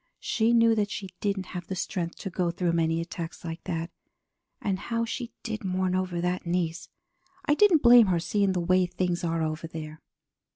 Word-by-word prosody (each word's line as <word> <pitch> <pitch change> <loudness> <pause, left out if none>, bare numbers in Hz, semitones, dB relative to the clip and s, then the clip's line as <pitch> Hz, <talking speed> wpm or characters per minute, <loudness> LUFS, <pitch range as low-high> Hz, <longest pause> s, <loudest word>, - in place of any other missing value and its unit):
She 225 0 +2
knew 230 -1 +5
that 210 -2 0
she 195 -2 -5
didn't 200 -2 -1
have 180 -1 -5
the 190 - -3
strength 175 -2 -3
to 195 - -5
go 175 0 0
through 175 0 0
many 165 -1 +1
attacks 170 0 -6
like 165 0 -6
that, 165 -1 -3 0.7
and 195 -3 -1
how 230 +3 -1
she 235 +1 -5
did 220 -2 -4
mourn 185 -1 0
over 185 -2 -1
that 180 +1 -1
niece. 170 -1 -2 0.6
I 295 - +3
didn't 345 -2 +5
blame 240 -2 +8
her, 175 -2 +2
seeing 195 +3 +1
the 180 - 0
way 185 +1 +3
things 180 -1 -2
are 165 -1 0
over 155 +1 -3
there. 155 -1 -8
180 Hz, 195 wpm, -27 LUFS, 170-205 Hz, 0.7 s, blame